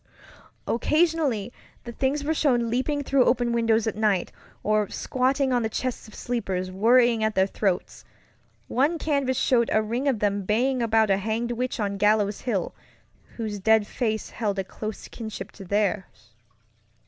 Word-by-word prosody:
Occasionally 290 - +1 0.3
the 235 - -7
things 275 +4 -1
were 310 +2 0
shown 245 -7 +1
leaping 285 +4 0
through 270 -2 +3
open 245 -1 +2
windows 230 -1 +2
at 220 - -2
night, 210 -4 +1 0.3
or 215 -1 +1
squatting 260 +1 0
on 245 - +2
the 220 - -1
chests 255 +1 -4
of 215 - -14
sleepers, 190 -7 -3
worrying 230 +3 +4
at 220 0 0
their 190 - +4
throats. 195 -2 -2 0.6
One 290 +7 +1
canvas 280 -5 0
showed 235 -3 +2
a 215 - +3
ring 240 +6 -2
of 265 -4 +2
them 205 -1 0
baying 245 +6 +1
about 220 -2 +3
a 195 - +3
hanged 220 +4 -2
witch 245 +1 -3
on 200 -2 -1
Gallows 210 0 +2
Hill, 210 -8 -2 0.6
whose 215 -3 -4
dead 220 +1 +4
face 220 -1 -3
held 205 -4 -2
a 195 - 0
close 215 +3 -7
kinship 220 -2 -7
to 195 - -11
theirs. 195 - -2
225 Hz, 160 wpm, -25 LUFS, 210-255 Hz, 0.6 s, worrying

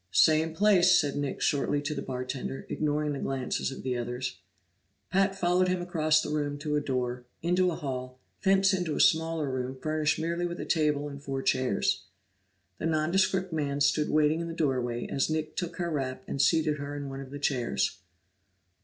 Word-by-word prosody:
"Same 155 - +4
place," 185 -2 +5
said 145 -2 -1
Nick 145 -1 -3
shortly 145 0 +1
to 150 +1 -2
the 140 - -4
bartender, 130 +1 -4
ignoring 150 -1 0
the 140 - -4
glances 135 0 -2
of 135 - -8
the 130 -1 -1
others. 125 -1 -3 0.7
Pat 195 +1 +2
followed 180 0 +2
him 185 0 +1
across 155 -3 +2
the - - -4
room 145 -1 -1
to 150 +1 -2
a 150 - +2
door, 125 -3 -2 0.2
into 180 +2 +3
a 170 - -2
hall, 130 -3 -5 0.2
thence 195 0 +4
into 180 -5 -1
a - - -2
smaller 160 -1 +3
room 130 0 -3
furnished 155 0 0
merely 170 +2 -1
with 175 0 -6
a - - -4
table 150 -2 +1
and 140 -1 -8
four 135 -1 -4
chairs. 130 -6 +1 0.8
The 165 - -1
nondescript 180 +3 +1
man 145 -2 -1
stood 145 +1 +2
waiting 155 +2 +3
in 170 - -4
the 165 - -5
doorway 125 -6 0
as 135 - 0
Nick 155 0 -2
took 175 -1 -3
her 175 -1 -2
wrap 135 -4 -3
and 140 - -1
seated 155 +1 +3
her 140 +1 -5
in 145 -1 -5
one 135 0 -6
of 135 - -9
the 145 - -6
chairs. 125 -7 0
150 Hz, 190 wpm, -29 LUFS, 135-165 Hz, 0.8 s, place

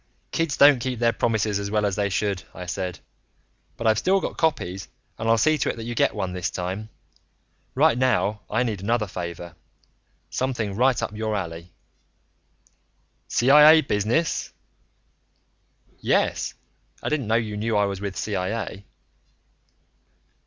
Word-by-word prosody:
"Kids 165 -3 -1
don't 140 -2 +7
keep 125 +1 -3
their 115 0 +2
promises 110 -3 0
as 100 0 -4
well 105 0 +1
as 100 -2 0
they 100 0 0
should," 100 -1 -1
I 90 - -7
said. 90 0 -4 0.8
"But 115 - -5
I've 110 -1 +4
still 195 +1 +2
got - - -4
copies 95 - -1 0.3
and 115 - -1
I'll 115 - +5
see 155 +6 +3
to - - 0
it - - -2
that 115 - -7
you 120 +1 -4
get 115 - +1
one, 95 -3 -3
this 90 0 -2
time. 95 +4 -4 0.9
Right - - +4
now 110 -5 +1
I 115 +4 +1
need 110 -6 -3
another 115 +2 0
favor 85 -2 -6 0.8
something 120 -6 -2
right 125 +3 +3
up 105 - -4
your 110 0 -2
alley." 85 -2 -5 1.6
"CIA 150 +5 +7
business?" 120 +6 0 1.5
"Yes. - - 0 0.5
I - - -1
didn't 145 -7 -1
know 110 - +2
you 110 -2 -1
knew 110 +1 0
I 105 - +3
was 100 -1 -4
with 100 -2 -4
CIA." 100 0 -3
110 Hz, 150 wpm, -24 LUFS, 100-120 Hz, 1.6 s, don't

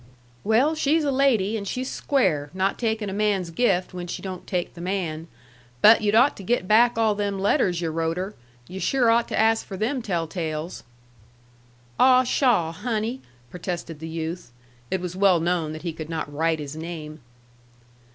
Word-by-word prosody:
"Well, 235 +9 +3
she's 310 +1 +1
a 285 - +1
lady, 240 -7 +2
and 200 -2 -4
she's 255 +5 -3
square, 180 - 0
not 190 +1 0
takin' 220 -2 -1
a 190 - -4
man's 200 -4 0
gift 185 -2 +1
when 180 -1 -6
she - - -6
don't 185 -2 -7
take 180 -2 -2
the 170 - -10
man. 170 -4 -3 0.5
But 220 - +7
you'd 210 0 +1
ought 250 +5 +5
to 195 - -9
get 190 -1 0
back 230 +3 +4
all 220 -2 +3
them 205 -1 -2
letters 185 -3 +1
yu' 165 -2 -1
wrote 165 +1 -1
her. 190 +3 -4 0.3
Yu' 190 - -7
sure 245 +1 +2
ought 235 +1 +2
to - - -3
ask 225 +1 +3
her - - -23
for 190 - -6
them 250 +6 -1
tell 175 -7 -1
tales." 160 0 -5 1.2
"Ah, 255 0 +6
pshaw, 240 - +2
Honey!" 225 +6 -3 0.3
protested 175 -3 -5
the 160 - -6
youth. 165 -2 -5 0.4
It 190 - -1
was 180 0 -5
well 190 -2 +4
known 170 -2 0
that 155 - -8
he 170 -2 -3
could 155 0 -8
not 160 -3 -4
write 160 +2 +1
his 150 -1 -7
name. 160 -1 -7
190 Hz, 190 wpm, -24 LUFS, 165-225 Hz, 1.2 s, But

